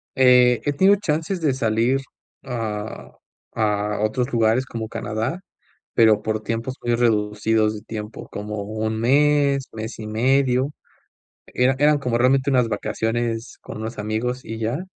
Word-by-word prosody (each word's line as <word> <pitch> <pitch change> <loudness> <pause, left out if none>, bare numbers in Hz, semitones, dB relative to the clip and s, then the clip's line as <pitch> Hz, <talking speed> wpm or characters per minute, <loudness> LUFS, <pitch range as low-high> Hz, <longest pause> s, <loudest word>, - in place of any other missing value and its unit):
Eh, 125 -2 +5
he 145 - +1
tenido 190 +7 +5
chances 170 -1 -1
de 150 -4 +2
salir 120 +2 +1 0.4
a 110 -4 -5 0.4
a 105 -1 0
otros 120 +5 0
lugares 115 +2 +2
como 115 -3 -5
Canadá, 115 +8 -3 0.5
pero, 110 -2 +5
por 110 -1 -1
tiempos 115 +4 -3
muy 120 0 +1
reducidos 110 -1 +1
de 105 - -8
tiempo, 105 -1 -7
como 105 0 -5
1 110 +1 -3
mes, 140 +2 +3
mes 110 +1 -6
y 110 - -6
medio, 130 +4 +2 0.8
era 125 +2 +1
eran 150 +1 +4
como 125 -4 -1
realmente 130 +2 +3
unas 125 -3 +3
vacaciones 115 +2 -2
con - - -8
unos 110 +1 -6
amigos 110 +4 -2
y 110 0 -6
ya. 120 +10 -2
115 Hz, 145 wpm, -22 LUFS, 110-130 Hz, 0.8 s, Eh